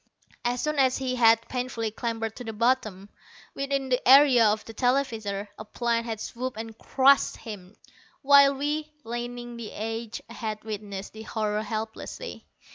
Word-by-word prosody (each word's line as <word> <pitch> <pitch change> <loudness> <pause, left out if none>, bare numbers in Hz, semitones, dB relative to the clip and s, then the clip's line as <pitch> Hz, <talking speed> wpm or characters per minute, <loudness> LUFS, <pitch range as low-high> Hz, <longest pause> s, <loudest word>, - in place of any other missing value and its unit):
As 245 0 0
soon 300 -1 -1
as 260 -1 +3
he 255 -1 -2
had 225 -1 +5
painfully 245 -3 -3
clambered 225 -1 -3
to 245 - -6
the 225 -1 -5
bottom, 215 -4 0 0.5
within 275 -1 -2
the 250 - +2
area 270 -3 +8
of 210 +1 0
the 225 - -9
televisors, 225 -5 0
a - - -5
plane 230 +1 -1
had 225 -2 -4
swooped 250 +2 -5
and 225 0 -6
crushed 275 +4 +3
him, 205 -3 -9 0.5
while 280 0 +7
we, 300 +2 -2
lining 240 +1 -5
the 230 -2 -7
edge, 225 +1 -4
had 215 -1 -5
witnessed 205 -2 -6
the 220 - -9
horror 215 -1 -2
helplessly. 220 - -6
230 Hz, 155 wpm, -27 LUFS, 220-260 Hz, 0.5 s, area